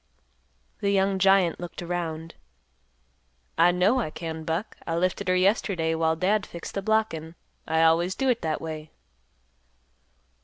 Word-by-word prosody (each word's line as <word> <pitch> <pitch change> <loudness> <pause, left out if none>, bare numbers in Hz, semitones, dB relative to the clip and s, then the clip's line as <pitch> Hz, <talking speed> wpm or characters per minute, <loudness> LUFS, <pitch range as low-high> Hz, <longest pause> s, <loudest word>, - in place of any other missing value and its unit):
The 200 - 0
young 195 -1 +2
giant 195 -3 +4
looked 175 0 -7
around; 165 -2 -4 1.2
"I 165 +2 +5
know 185 +8 +3
I 220 - -2
can, 160 0 -6
Buck; 165 +7 -3
I 165 - -1
lifted 180 +2 -1
her 185 - +3
yesterday 185 -3 +1
while 160 0 +1
Dad 195 +5 +1
fixed 170 -3 -8
the 195 - -2
blockin'; 195 -7 -1 0.3
I 160 0 +2
always 170 +3 +3
do 270 - -1
it 245 -2 +2
that 160 -2 -2
way." 155 -1 -6
175 Hz, 145 wpm, -26 LUFS, 160-195 Hz, 1.2 s, I